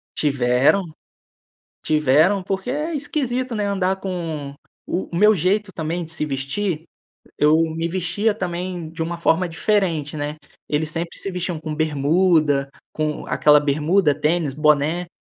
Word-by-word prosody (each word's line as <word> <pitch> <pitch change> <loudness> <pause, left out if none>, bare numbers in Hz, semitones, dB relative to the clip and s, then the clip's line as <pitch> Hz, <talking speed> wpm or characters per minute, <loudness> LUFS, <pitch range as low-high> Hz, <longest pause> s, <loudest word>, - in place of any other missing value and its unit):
Tiveram, 140 +5 +2 1.0
tiveram. 155 +6 +3
Porque 190 +5 -3
é 305 +5 -2
esquisito, 255 -4 -2
né, 210 -2 -1
andar 190 -1 0
com 165 -7 -5 0.3
O 180 - -3
o - - -1
meu 210 +4 +6
jeito 195 +3 0
também 165 +2 -3
de 160 - -6
se 155 - 0
vestir 150 +5 -3 0.5
eu 150 +1 +4 0.2
me 165 +1 -1
vestia 185 +5 0
também 180 -3 -4
de 165 0 -4
uma 170 +1 -4
forma 170 +1 +1
diferente, 165 -5 0
né. 150 +1 -4 0.3
Eles 150 +1 0
sempre 165 +2 -4
se - - -2
vestiam 180 -3 -3
com 155 -1 -5
bermuda 155 -1 +2 0.2
com 155 -1 -2
aquela 150 0 +5
bermuda, 150 +3 +2
tênis, 155 -1 0
boné. 150 +4 +2
165 Hz, 140 wpm, -21 LUFS, 150-190 Hz, 1.0 s, meu